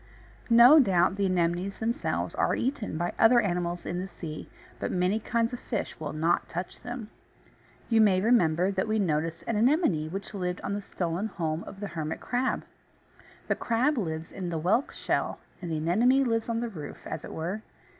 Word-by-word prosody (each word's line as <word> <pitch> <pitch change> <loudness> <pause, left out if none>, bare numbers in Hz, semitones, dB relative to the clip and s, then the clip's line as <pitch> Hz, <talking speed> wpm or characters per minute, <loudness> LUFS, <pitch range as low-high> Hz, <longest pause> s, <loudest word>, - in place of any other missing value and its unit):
No 240 +6 +9
doubt 190 -7 +3
the 200 -1 +1
Anemones 180 +1 0
themselves 230 +1 -1
are - - +1
eaten 250 - -2
by 175 +2 -1
other 240 +2 +7
animals 175 -4 -1
in 175 - -2
the 190 - -4
sea, 160 -5 -8 0.3
but - - -2
many 185 +4 +1
kinds 230 +1 0
of 245 - -4
fish 225 -5 -4
will - - -4
not 165 +3 0
touch 175 +2 -5
them. 245 -3 -7 0.8
You 225 -2 +4
may 195 -4 +5
remember 185 -5 +3
that 190 +2 -1
we 215 0 +1
noticed 165 -3 -1
an 225 - -1
Anemone 230 - +2
which 195 +4 -6
lived 180 -2 -2
on - - -3
the 205 - -2
stolen 180 +1 -2
home 165 -5 -3
of 195 - -10
the 205 -1 -4
Hermit 160 -1 -4
Crab. 250 +1 -1 0.8
The - - +2
crab 250 +6 +1
lives 160 -8 -3
in 185 -2 -5
the 165 - -2
whelk 200 - +1
shell, - - -1 0.2
and 175 - -5
the 160 - -1
Anemone 230 - +3
lives 230 -2 0
on 230 0 0
the 240 - -2
roof, 155 -9 -9
as - - -5
it - - -8
were. 180 +7 -3
195 Hz, 190 wpm, -28 LUFS, 170-230 Hz, 0.8 s, No